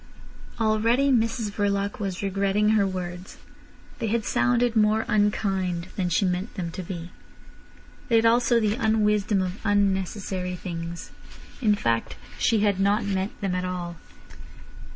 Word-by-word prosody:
Already 230 +5 +2
Mrs 230 -3 +1
Verloc 200 0 -1
was 195 -2 -3
regretting 200 +2 +1
her 210 -2 +3
words. 180 -1 -6 0.6
They 225 - -1
had 220 0 0
sounded 245 -1 +2
more 215 0 +3
unkind 190 -4 0
than 180 -3 -1
she 175 +4 +2
meant 180 +4 -2
them 175 -4 -4
to 185 - -6
be. 175 -1 -7 1.0
They 230 - +3
had 225 0 +4
also 235 +1 +4
the 210 -2 +1
unwisdom 210 -3 +1
of 185 +2 -4
unnecessary 190 -2 0
things. 170 -1 -6 0.5
In 210 -4 +4
fact, 115 - -1 0.2
she 225 -3 +2
had 200 -2 +2
not 200 +3 +2
meant 195 0 -2
them 195 -2 -1
at 180 0 -1
all. 180 -2 -4
200 Hz, 140 wpm, -25 LUFS, 185-220 Hz, 1.0 s, had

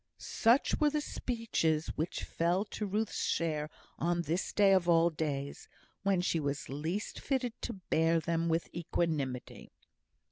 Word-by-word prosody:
Such 235 +4 +2
were 300 - +4
the 300 +1 0
speeches 225 - -1
which 160 +3 -2
fell 175 +4 0
to 210 0 -4
Ruth's 215 +3 -1
share 155 -2 0 0.3
on 170 +1 +1
this 165 +4 -1
day 200 -2 +5
of 180 -2 +3
all 170 0 +5
days, 145 -3 -3 0.3
when 195 -2 +2
she 170 -2 +1
was 140 -1 -3
least 160 +9 -3
fitted 260 -4 -1
to 235 - -3
bear 165 -3 +1
them 165 +1 0
with 165 +1 +1
equanimity. 155 -6 -2
170 Hz, 145 wpm, -32 LUFS, 160-200 Hz, 0.3 s, day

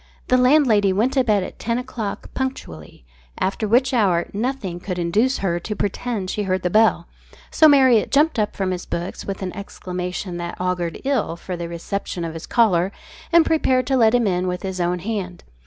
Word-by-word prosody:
The 255 - +5
landlady 250 -7 +4
went 220 +7 +1
to 265 - +3
bed 210 -5 +2
at - - -9
ten 230 +1 -1
o'clock 245 -5 -5
punctually, 80 - -6 0.3
after 200 +3 -1
which 255 +5 +3
hour 185 -8 +2
nothing 210 -6 -3
would 180 -2 -2
induce 205 +10 +1
her 175 -3 -1
to 210 +5 -5
pretend 205 -1 -3
she 210 - -2
heard 185 -2 -1
the 180 - 0
bell, 215 -5 +3 0.4
so 315 - +6
Marriott 260 -6 +5
jumped 295 -2 +2
up 210 - -1
from 190 -2 -1
his 180 -1 -5
books 175 +1 -5
with 195 -1 -5
an 185 - -5
exclamation 180 -2 -5
that 170 0 -6
augured 180 -2 -2
ill 265 -11 0
for 180 +2 -6
the 170 -1 -5
reception 170 +1 -4
of 165 - -5
his 165 0 -8
caller, 195 -6 +2 0.4
and 335 -1 +6
prepared 260 -5 +2
to 270 - +1
let 230 -2 +4
him 240 -2 +2
in 185 -2 0
with 180 0 -3
his 190 -1 -3
own 175 +1 0
hand. 185 -2 -5
200 Hz, 195 wpm, -21 LUFS, 180-245 Hz, 0.4 s, so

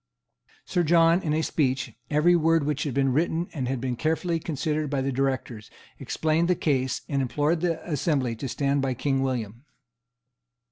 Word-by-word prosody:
Sir 180 - 0
John, 165 +1 +4
in 155 - -2
a 160 - 0
speech, 135 -6 -1 0.2
every 155 +4 +4
word 165 -1 +3
of - - -3
which 150 0 -1
had 140 - -2
been 135 -2 +2
written 165 +3 0
and 135 -6 -3
had 130 0 -2
been 125 0 -2
carefully 160 +5 0
considered 150 -1 -2
by 140 -1 -1
the 135 +1 -1
Directors, 130 -4 -2 0.3
explained 160 +2 0
the 180 - +3
case, 130 -5 0
and 140 -2 0
implored 150 +5 0
the 170 -2 -2
assembly 140 -6 0
to 135 +2 -5
stand 140 +2 0
by 135 -1 -1
King 135 +1 0
William. 120 -3 -3
145 Hz, 180 wpm, -26 LUFS, 130-160 Hz, 0.3 s, John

